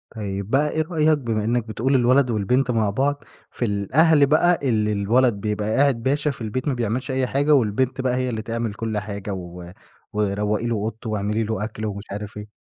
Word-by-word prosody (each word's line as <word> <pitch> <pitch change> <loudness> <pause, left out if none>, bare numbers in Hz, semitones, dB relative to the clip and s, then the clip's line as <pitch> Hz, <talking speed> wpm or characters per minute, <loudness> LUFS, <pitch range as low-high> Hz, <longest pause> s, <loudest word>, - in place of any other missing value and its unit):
طيب 100 -2 -4
بقى 145 +4 +2
إيه 160 - 0
رأيك، 155 -2 +2
بما 115 -5 -2
إنك 120 +1 0
بتقول 125 +5 0
الولد 130 +1 +4
والبنت 125 +5 +1
مع 110 -3 +1
بعض، 140 +7 -1 0.3
في 120 - -2
الأهل 140 - +3
بقى 165 +5 +3
اللي 105 -2 +1
الولد 115 +5 +2
بيبقى 105 +1 -2
قاعد 135 -4 +2
باشا 145 +3 +1
في 125 - -11
البيت، 120 +6 -3
ما 140 - +2
بيعملش 120 +3 -2
أي 130 -1 0
حاجة، 145 +4 +2
والبنت 125 +2 +1
بقى 125 -1 0
هي 130 0 -1
اللي 110 -2 -3
تعمل 115 -1 -3
كل 110 -1 -3
حاجة 100 -1 -4
و 90 -1 -8 0.4
وروقي 105 +1 0
له 115 - 0
أوضته 110 +2 -4
واعملي 105 +1 -1
له 110 -1 -2
أكل 110 0 -5
ومش 100 -1 -4
عارف 105 +1 -6
إيه؟ 105 0 -8
115 Hz, 200 wpm, -23 LUFS, 105-130 Hz, 0.4 s, الولد